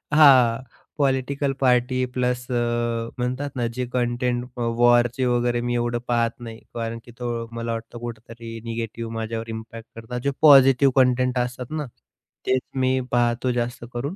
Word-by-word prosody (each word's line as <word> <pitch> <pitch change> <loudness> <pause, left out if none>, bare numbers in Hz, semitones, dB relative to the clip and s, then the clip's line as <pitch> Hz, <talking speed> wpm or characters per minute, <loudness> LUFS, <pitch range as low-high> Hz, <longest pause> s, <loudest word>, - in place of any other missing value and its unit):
हां. 130 -5 +6 0.3
Political 140 0 0
party 125 0 +2
plus 125 -1 -1
अ, - - 0 0.6
म्हणतात 130 +3 -2
ना 120 -2 -1
जे 125 0 -2
कंटेंट 120 0 0
अ, - - -3 0.2
वॉरचे 120 +1 +4
वगैरे 120 -1 +1
मी 120 0 -2
एवढं 120 0 0
पाहत 115 -1 +1
नाही, 115 -2 -9 0.2
कारण 115 0 -3
की 120 - -13
तो 120 -1 -3
मला 115 0 -3
वाटतं 115 +1 -7
कुठेतरी 115 0 -8
निगेटिव्ह 115 0 -5
माझ्यावर 115 0 -4
इम्पॅक्ट 115 0 -8
करतात. 115 +2 -6
जे 140 - +1
पॉझिटिव्ह 135 -2 +7
कंटेंट 125 -1 +3
असतात 125 +1 -4
ना, 155 -1 -2 0.6
तेच 130 0 +2
मी 130 0 +2
पाहतो 120 +1 +1
जास्त 120 0 -3
करून. 140 +9 -3
120 Hz, 155 wpm, -23 LUFS, 115-130 Hz, 0.6 s, पॉझिटिव्ह